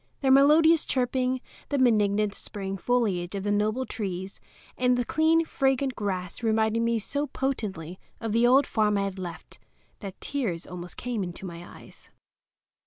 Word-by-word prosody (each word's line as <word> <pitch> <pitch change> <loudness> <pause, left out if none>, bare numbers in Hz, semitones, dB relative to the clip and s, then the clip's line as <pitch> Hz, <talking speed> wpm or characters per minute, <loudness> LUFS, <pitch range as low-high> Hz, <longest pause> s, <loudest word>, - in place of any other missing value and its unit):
Their 265 -1 +3
melodious 310 +4 +6
chirping, 255 0 0 0.3
the 285 - 0
benignant 210 -4 +3
spring 195 -2 -6
foliage 195 -4 0
of 195 - -3
the 205 - 0
noble 215 +5 0
trees 190 -5 -5 0.4
and 250 0 +2
the 245 - 0
clean, 325 +3 +3
fragrant 270 -3 0
grass 185 -3 -4
reminded 220 0 +1
me 230 0 +1
so 285 +7 -2
potently 195 - -4 0.2
of 225 -2 -3
the 230 +2 +4
old 270 +3 +5
farm 210 -2 +1
I 200 - +1
had 195 -1 -4
left 175 -2 -8 0.4
that 195 -3 -8
tears 225 -13 -3
almost 180 0 -8
came 240 -4 -3
into 175 +1 -7
my 170 -1 -7 0.2
eyes. - - -16
220 Hz, 160 wpm, -27 LUFS, 195-260 Hz, 0.4 s, melodious